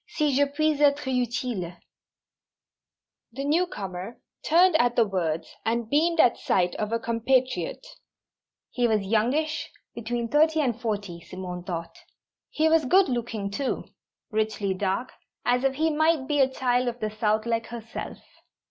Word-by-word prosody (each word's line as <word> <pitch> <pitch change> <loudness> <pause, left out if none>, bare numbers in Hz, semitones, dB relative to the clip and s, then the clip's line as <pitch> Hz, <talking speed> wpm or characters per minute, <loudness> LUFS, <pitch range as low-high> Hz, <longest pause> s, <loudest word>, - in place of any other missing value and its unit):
Si 300 -4 0
je 285 +1 +4
puis 305 +1 0
être 290 0 +3
utile 245 -5 -1
_" - - -23 1.6
The 275 +3 -4
newcomer 230 - -2 0.2
turned 350 +2 +5
at 245 -4 +2
the 230 - +4
words, 170 -5 -2
and 225 0 -1
beamed 330 +3 +2
at 245 - +5
sight 180 -1 +1
of 215 0 -2
a 230 - +2
compatriot. 255 - 0 0.9
He 245 -1 +1
was 215 -3 +1
youngish, 255 +10 0 0.2
between 235 0 -3
thirty 315 +4 +3
and 245 -5 0
forty, 205 -7 -3
Simone 180 +1 -7
thought. 170 -3 -5 0.5
He 315 +1 +1
was 320 -2 +3
good 370 +7 +4
looking, 230 -5 -3
too; 270 +6 -2 0.5
richly 215 -2 0
dark, 195 +6 -2 0.3
as 250 +1 +2
if 270 0 +1
he 320 +3 +1
might 315 -2 +2
be 295 -1 +1
a 265 -1 +5
child 250 -1 +1
of 240 0 -3
the 215 -2 -2
south, 215 0 0
like 230 -1 -1
herself. 230 -1 -7
240 Hz, 150 wpm, -26 LUFS, 215-285 Hz, 1.6 s, turned